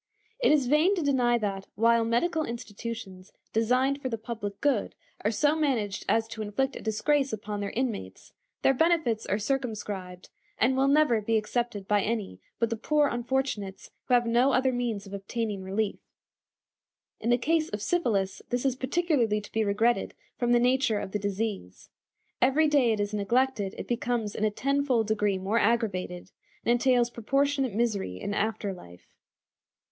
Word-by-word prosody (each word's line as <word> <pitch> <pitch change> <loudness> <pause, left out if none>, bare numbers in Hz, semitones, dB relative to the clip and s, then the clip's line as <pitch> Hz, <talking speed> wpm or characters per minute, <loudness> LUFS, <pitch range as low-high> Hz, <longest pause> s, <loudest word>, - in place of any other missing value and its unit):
It - - +4
is 295 -4 +4
vain 305 +9 +3
to 345 - -1
deny 250 -4 +3
that, 195 -3 -3
while 230 +2 +4
medical 310 +9 +1
institutions 225 -5 -7 0.2
designed 255 +5 +2
for 260 - -2
the 230 - -2
public 215 -3 -6
good 275 -8 0 0.3
are 210 - +2
so 290 +7 +2
managed 240 -10 -1
as 225 0 +2
to 220 - -6
inflict 265 +6 -1
a - - -7
disgrace 270 +6 +1
upon 210 -1 -4
their 200 0 -2
inmates, 220 - -4 0.3
their 270 - +5
benefits 315 -7 +1
are 200 - +1
circumscribed, 210 -7 -4 0.3
and 255 +4 +3
will 270 +1 +3
never 280 -6 +4
be 225 +2 +1
accepted 215 -2 -2
by 205 -1 +3
any 205 - -3 0.2
but 230 -1 0
the 230 - -1
poor 295 +5 +2
unfortunates 240 -5 -3
who 250 - +3
have 240 -1 +3
no 240 +4 +3
other 260 +1 +3
means 235 -5 -2
of 195 - -11
obtaining 200 +1 -3
relief. 195 +2 -2 1.2
In 230 - -2
the 240 - +5
case 315 +5 +1
of 210 - -4
syphilis 210 - 0
this 245 +2 -1
is 265 -2 +2
particularly 260 -6 +1
to 210 - -12
be 220 - +1
regretted 220 +4 +1 0.2
from 240 -1 0
the 240 - +5
nature 250 -2 +2
of 190 - -6
the 210 - -1
disease. 200 - -4 0.5
Every 275 +5 +4
day 280 -6 +3
it 215 - 0
is 205 0 -2
neglected 210 0 0
it - - -6
becomes 235 -3 -1
in 215 - -1
a - - +3
tenfold 270 0 +1
degree 210 -2 +1
more 195 +5 0
aggravated, 195 -6 -1 0.3
and - - +3
entails 240 -1 +3
proportionate 275 0 0
misery 205 - -1
in 205 - -3
after 210 -1 -1
life. 90 - -15
230 Hz, 170 wpm, -28 LUFS, 205-265 Hz, 1.2 s, their